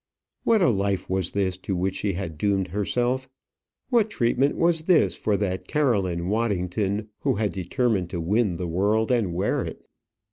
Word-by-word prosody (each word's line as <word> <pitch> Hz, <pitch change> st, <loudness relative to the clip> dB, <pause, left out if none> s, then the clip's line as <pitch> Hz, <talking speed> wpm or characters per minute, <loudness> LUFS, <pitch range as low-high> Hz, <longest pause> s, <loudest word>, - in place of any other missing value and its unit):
What 220 Hz, -4 st, +4 dB
a 150 Hz, -, +5 dB
life 100 Hz, -2 st, -1 dB
was 95 Hz, -2 st, 0 dB
this 95 Hz, -2 st, -1 dB
to 95 Hz, +1 st, -3 dB
which 95 Hz, +2 st, 0 dB
she 100 Hz, -2 st, -1 dB
had 85 Hz, -3 st, -4 dB
doomed 95 Hz, -1 st, +1 dB
herself! 125 Hz, +7 st, -1 dB, 0.6 s
what 225 Hz, -3 st, +3 dB
treatment 130 Hz, -, +1 dB
was 170 Hz, -1 st, +2 dB
this 160 Hz, -, +3 dB
for 105 Hz, -2 st, 0 dB
that 95 Hz, -2 st, -2 dB
Caroline 95 Hz, -, +1 dB
Waddington, 100 Hz, -1 st, -1 dB
who -, -, +1 dB
had 105 Hz, 0 st, -1 dB
determined 95 Hz, 0 st, 0 dB
to 85 Hz, -, -4 dB
win 100 Hz, +3 st, +1 dB
the 90 Hz, +1 st, -3 dB
world 105 Hz, +7 st, +1 dB
and 105 Hz, -9 st, +1 dB
wear 95 Hz, +4 st, 0 dB
it! -, -, -8 dB
100 Hz, 170 wpm, -25 LUFS, 95-120 Hz, 0.6 s, a